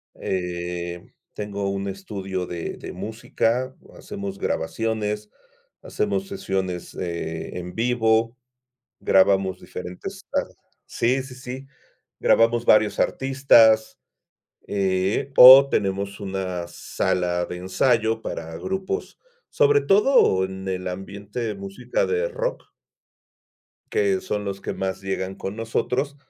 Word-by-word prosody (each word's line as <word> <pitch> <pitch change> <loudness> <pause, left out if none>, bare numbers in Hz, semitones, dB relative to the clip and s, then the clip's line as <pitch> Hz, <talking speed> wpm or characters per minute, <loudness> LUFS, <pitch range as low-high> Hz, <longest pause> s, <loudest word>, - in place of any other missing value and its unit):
Eh, 85 -1 -4 0.2
tengo 100 -1 -3
un 100 0 -3
estudio 95 -1 -4
de 85 -1 -5
de - - -8
música, 115 +5 -2 0.2
hacemos 100 -1 -7
grabaciones, 105 +4 -2 0.5
hacemos 100 -2 -2
sesiones, 95 -2 -3
eh, 85 -2 -4
en 90 0 -7
vivo, 115 0 +2 0.7
grabamos 95 -1 +3
diferentes 90 0 -8
ar - - +1 0.4
sí, 125 +3 0
sí, 130 -1 -10
sí. 130 +1 -8 0.5
Grabamos 115 +1 +3
varios 105 -1 +4
artistas, 120 -5 +4 0.7
eh, 95 +6 0
oh 130 +2 +11
tenemos 100 0 -1
una 95 -3 -3
sala 90 0 -1
de 90 - -6
ensayo 110 +4 +1
para 80 -5 -6
grupos, 190 - -4 0.3
sobre 435 -2 +4
todo 195 - +4
en 95 0 -7
el 95 -1 -3
ambiente 100 +4 -6
de 110 -3 -2
música 100 +6 -2
de 455 +3 0
rock - - -3 1.3
que 405 -3 +2
son 105 0 -3
los 100 -1 -4
que - - -4
más 95 -1 -3
llegan 95 -1 -3
con 95 - -5
nosotros, 125 +5 -2
100 Hz, 110 wpm, -23 LUFS, 95-120 Hz, 1.3 s, oh